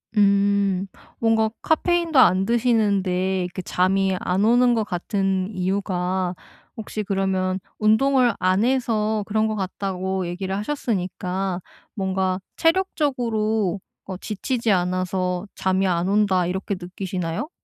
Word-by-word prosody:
음, 200 -1 +3 0.3
뭔가 225 -1 +2
카페인도 335 -1 +1
안 190 -5 +5
드시는데 200 -5 +1
이렇게 180 +1 -5
잠이 190 +2 +1
안 190 +3 0
오는 245 +2 +4
거 225 - +1
같은 195 0 -1
이유가 185 -1 -1 0.4
혹시 215 -1 -4
그러면 190 -1 0 0.2
운동을 245 +3 +3
안 185 +3 +2
해서 220 -4 +1
그런 220 +1 +1
거 215 - -2
같다고 190 -1 -3
얘기를 190 +2 -3
하셨으니까 190 -6 -2 0.4
뭔가 190 -1 -1 0.2
'체력적으로 235 - 0 0.3
어 185 -2 -6
지치지 230 +3 -2
않아서 180 0 0
잠이 190 +1 +1
안 175 0 0
온다.' 195 -3 +2
이렇게 190 +3 -2
느끼시나요? 180 - -4
195 Hz, 265 characters per minute, -23 LUFS, 185-220 Hz, 0.4 s, 안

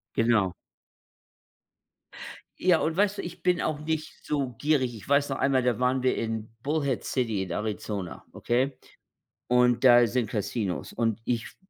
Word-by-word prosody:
Genau. 115 -6 +2 2.1
Ja, 180 -3 +4
und 160 +1 -1
weißt 205 0 +2
du, - - -2
ich 175 0 -9
bin 180 -2 +2
auch 150 - -1
nicht 155 0 -4
so 140 -3 -1
gierig. 140 -5 +1
Ich 105 - -12
weiß 140 0 +3
noch 135 - -2
einmal, 135 -2 +2
da 120 -2 +1
waren 125 +1 +1
wir 130 - +2
in 110 -1 -3
Bullhead 140 -4 -1
City 115 -7 -1
in 90 - -7
Arizona, 105 -3 -4
okay? 130 +3 0 0.7
Und 125 0 +3
da 120 -1 +8
sind 120 -1 -1
Casinos. 105 -3 -3
Und 115 -1 -1
ich 115 -2 -1
f - - -12
125 Hz, 160 wpm, -27 LUFS, 115-145 Hz, 2.1 s, da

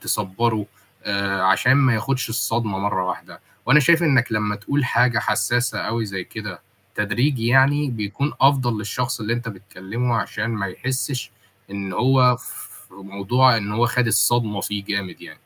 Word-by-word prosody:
تصبَّره 105 +2 -1 0.4
آآ 100 -2 -1
عشان 105 +7 +4
ما 130 -3 +4
ياخدش 130 +3 -1
الصدمة 115 -3 -1
مَرّة 100 -2 -1
واحدة، 90 - -6 0.3
وأنا 150 +4 +6
شايف 165 +4 +4
إنك 130 -8 +2
لمّا 105 -1 -1
تقول 140 +7 -1
حاجة 120 -1 +2
حساسة 120 0 0
أوي 115 0 -2
زي 95 -2 -5
كده - - -8 0.3
تدريجي 115 +4 0
يعني 135 +3 +3
بيكون 115 +6 -3
أفضَل 130 -5 +3
للشخص 120 +4 -3
اللي 110 +2 -2
أنت 120 -1 -5
بتكلّمه 105 +4 -4
عشان 110 -1 -3
ما 110 -4 -2
يحسّش 130 +6 -3 0.4
إن 100 -1 -5
هو 125 +3 +4
ف - - -10 0.2
موضوع 100 +6 +2
إن 105 -1 -3
هو 115 +3 +2
خَد 125 0 +1
الصدمة 110 -2 +2
فيه 100 0 -4
جامد 100 -2 -4
يعني. - - -10
115 Hz, 155 wpm, -21 LUFS, 100-125 Hz, 0.4 s, وأنا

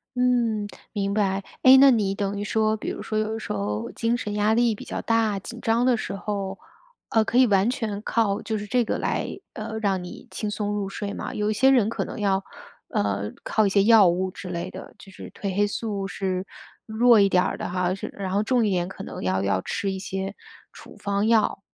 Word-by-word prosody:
嗯， 240 -4 +1 0.3
明 200 -2 -1
白。 200 -2 0 0.2
哎， 260 0 +9
那 275 0 +8
你 205 -5 +1
等 200 0 -2
于 - - -2
说， 215 +1 +1
比 - - -4
如 - - -5
说 215 - -3
有 215 +1 -1
时 - - -6
候 105 +2 -3
精 230 +1 0
神 210 -4 -4
压 210 +1 +2
力 235 -1 +3
比 - - -10
较 - - -4
大、 225 -3 +1
紧 235 +5 -9
张 230 +2 +2
的 255 -1 +4
时 205 - -4
候， 195 -1 -4 0.5
呃， 225 - +3
可 230 +3 -1
以 255 - +6
完 200 +1 +3
全 215 -5 -3
靠 215 -4 +1
就 220 - -2
是 210 - -5
这 245 +3 +2
个 - - -2
来， - - -1 0.3
呃， 220 -1 -5
让 195 -4 0
你 180 - -10
轻 210 - -3
松 205 0 -2
入 205 -1 -2
睡 200 +1 -5
吗？ - - -5
有 210 0 -1
一 - - +1
些 260 +6 +4
人 245 -6 +4
可 - - -2
能 - - -7
要， 195 -1 +1 0.5
呃， 100 0 -1
靠 215 - +2
一 - - +2
些 195 0 +3
药 220 -4 +7
物 185 +2 0
之 180 0 -8
类 175 +1 -4
的， - - -10
就 195 -1 -14
是 - - -10
褪 195 -2 -4
黑 205 +1 +3
素 205 -2 -3
是 190 -1 -3 0.4
弱 230 +1 +5
一 200 -1 +5
点 180 -1 +3
儿 - - -2
的 - - -4
哈， 180 0 0
是 195 - -6
然 195 -2 -4
后 200 +2 +1
重 245 0 +2
一 - - +1
点 180 -2 0
可 195 - -8
能 - - -7
要 95 +1 0
要 100 -1 +1
吃 195 - -2
一 190 - -4
些 195 +1 -4 0.4
处 - - -13
方 200 +1 -1
药。 225 -3 +2
205 Hz, 250 characters per minute, -25 LUFS, 195-225 Hz, 0.5 s, 哎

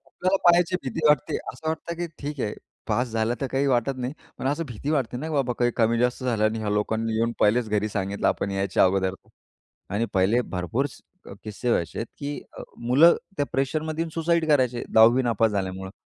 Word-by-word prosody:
आपल्याला 185 +2 0
पाहायची 175 +1 +5
भीती 130 +3 -4
वाटते. 150 -4 +2 0.2
असं 160 - -6
वाटतं 160 +1 -3
की 175 0 -2
ठीक 145 -1 -5
आहे 105 - -2 0.3
पास 125 +1 0
झालं 110 +1 0
तर 135 - 0
काही 135 +1 +1
वाटत 130 0 +1
नाही, 125 +1 -3 0.3
पण - - -3
असं 150 +4 0
भीती 125 +3 -5
वाटते 135 -6 0
ना, 155 +6 -4
बाबा 135 -5 0
काही 120 0 +3
कमी 115 0 +2
जास्त 125 +2 0
झालं 115 -4 +1
आणि 110 +1 +1
ह्या 105 -1 -2
लोकांनी 110 +2 -1
येऊन 115 +1 +1
पहिलेच 110 +2 +3
घरी 105 0 0
सांगितलं 100 -1 -2
आपण 100 - -1
यायच्या 95 0 +2
अगोदर 95 0 +1 0.8
आणि 105 +4 0
पहिले 100 +6 +3
भरपूर 110 +6 -2
स - - -15 0.4
किस्से 110 +3 -4
व्हायचेत, 115 +1 -1
की 145 0 -4 0.2
अ, - - -6 0.2
मुलं 135 +8 +5 0.2
त्या 145 - +1
प्रेशरमध्ये 155 +4 -1
येऊन 165 - -2
सुसाईड 165 0 +1
करायचे 125 -5 +2
10वी 115 +3 +6
नापास 115 -2 +2
झाल्यामुळे. 95 -1 -3
120 Hz, 195 wpm, -25 LUFS, 110-145 Hz, 0.8 s, 10वी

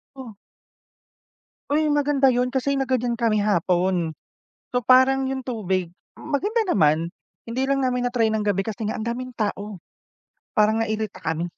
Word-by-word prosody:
Oh. 250 -6 -9 1.3
Uy, 305 +2 +2
maganda 285 -2 +3
yun 250 +1 +1
kasi 270 +2 0
nagganyan 255 -3 0
kami 230 -2 +1
hapon. 180 -3 +1 0.6
So, 245 - 0
parang 260 +1 +5
yung 265 - -3
tubig, 190 -8 -2 0.3
maganda 405 - -1
naman. 160 - +3 0.4
Hindi 255 +3 -1
lang 275 0 +1
namin 250 -1 0
na-try 245 -2 +1
ng 220 -1 -1
gabi 200 -2 +1
kasi 215 +1 -4
nga 215 - -1
ang 220 - -3
daming 255 +2 -4
tao, 210 -4 -4 0.7
parang 215 +1 +2
nairita 215 -1 -3
kami. 160 +1 -2
235 Hz, 145 wpm, -23 LUFS, 205-260 Hz, 1.3 s, parang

